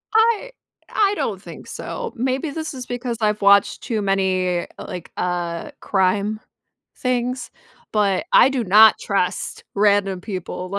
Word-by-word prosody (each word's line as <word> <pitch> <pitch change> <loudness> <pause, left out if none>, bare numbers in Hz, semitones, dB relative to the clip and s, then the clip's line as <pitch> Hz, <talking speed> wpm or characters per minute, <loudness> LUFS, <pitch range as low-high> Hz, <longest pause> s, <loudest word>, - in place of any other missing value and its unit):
I 460 +2 +3 0.4
I 405 -1 +2
don't - - -3
think - - -11
so, 480 -2 -6
maybe 260 +5 -1
this 315 +1 -5
is 255 -2 -7
because 245 -1 -4
I've 210 0 +1
watched 200 0 +4
too 220 -3 -2
many, 190 -2 +1
eh - - -4
like, 180 -2 -8
uh, 175 -1 -2
crime 200 +2 0 0.6
things, 250 0 -2 0.4
but 205 +2 +1
I - - +7
do 270 -2 -1
not 215 +3 +7
trust 195 -3 -2
random 200 -2 +2
people, 185 -2 -6
210 Hz, 140 wpm, -21 LUFS, 190-255 Hz, 0.6 s, I